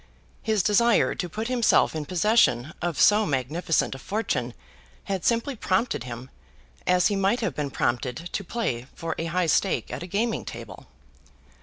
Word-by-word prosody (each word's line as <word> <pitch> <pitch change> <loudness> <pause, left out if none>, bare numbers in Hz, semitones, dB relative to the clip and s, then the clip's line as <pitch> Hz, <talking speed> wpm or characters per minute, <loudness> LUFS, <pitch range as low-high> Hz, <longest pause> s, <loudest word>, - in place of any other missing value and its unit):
His 215 -4 +1
desire 230 +4 +3
to 180 - -4
put 220 +6 -4
himself 245 -8 +3
in 155 -1 -3
possession 170 - +2
of 175 -4 -2
so 210 +1 +6
magnificent 150 +5 0
a 135 - -8
fortune 130 - -2 0.5
had 195 -3 -3
simply 235 +4 +1
prompted 210 - 0
him, 125 +1 -8 0.6
as 180 0 +4
he 205 - 0
might 195 +5 +1
have 215 -6 -1
been 145 -2 -3
prompted 125 -1 -1
to 175 +4 -5
play 135 - -3
for 165 -1 -3
a 165 - -2
high 175 +2 0
stake 185 +4 +1
at - - -5
a 175 - -6
gaming 215 +5 -1
table. - - -9
180 Hz, 165 wpm, -25 LUFS, 150-215 Hz, 0.6 s, so